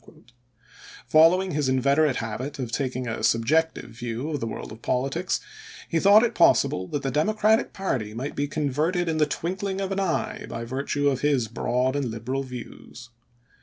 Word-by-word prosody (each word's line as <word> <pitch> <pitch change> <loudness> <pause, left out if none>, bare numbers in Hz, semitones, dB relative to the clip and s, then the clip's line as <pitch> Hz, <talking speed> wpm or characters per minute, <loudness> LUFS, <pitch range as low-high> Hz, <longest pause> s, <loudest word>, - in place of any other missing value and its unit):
Follow 165 +4 +5
ing 190 - -5
his 145 -3 0
inveterate 140 +2 +3
habit 115 +5 -4
of 125 -4 -4
taking 130 -1 -2
a 115 - -3
subjective 155 +8 +1
view 120 +5 -4
of 145 - -2
the 115 - -3
world 110 - -6
of 110 +1 -11
politics, 135 +10 -1 0.5
he 165 - +1
thought 200 +5 +7
it 240 - +1
possible 95 0 +3
that 145 - -3
the 135 - -1
Democratic 215 - +2
party 130 - -2
might 130 +5 -4
be 145 +1 -1
converted 155 +5 -1
in 160 -1 0
the 150 -1 +3
twinkling 190 +5 -3
of 195 0 -3
an 195 - -1
eye 205 +2 -2
by 115 0 -5
virtue 140 +3 -1
of 135 -2 +1
his 140 -6 +2
broad 125 +3 -1
and 140 -1 0
liberal 120 +3 -3
views. 125 -1 -10
140 Hz, 175 wpm, -25 LUFS, 125-165 Hz, 0.5 s, thought